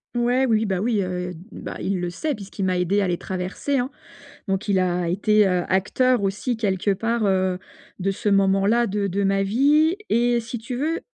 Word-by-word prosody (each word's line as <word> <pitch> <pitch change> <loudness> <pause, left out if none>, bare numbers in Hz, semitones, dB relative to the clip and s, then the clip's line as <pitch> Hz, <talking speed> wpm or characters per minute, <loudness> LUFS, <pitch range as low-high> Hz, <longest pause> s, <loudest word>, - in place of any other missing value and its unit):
Ouais, 245 +2 +2
oui, 220 -2 +2
bah, 190 -2 -1
oui, 220 -3 +1
heu, 180 0 -4
d - - -11
bah - - -7
il 190 -2 -1
le 175 0 -2
sait, 290 - -2
puisqu'il 200 -2 -6
m'a 185 -1 +1
aidée 195 +3 +1
à 190 - +1
les 175 -1 0
traverser, 190 +9 -3
hein. 250 +2 -1 0.6
Donc 195 +2 -1
il 190 -2 +3
a 180 -2 0
été, 210 +3 +3
heu, 180 -1 +1
acteur 205 +5 +2
aussi 200 +5 -1
quelque 200 -2 0
part, 225 +3 0
heu, 185 -2 +1 0.4
de 195 +2 0
ce 210 +2 -2
moment-là, 195 +4 +3
de 200 0 -1
de 200 +2 -1
ma 195 0 +2
vie 295 - +3
et 240 +1 +2
si 235 +1 -5
tu 235 +3 -6
veux, 310 +6 -1
200 Hz, 205 wpm, -23 LUFS, 190-235 Hz, 0.6 s, il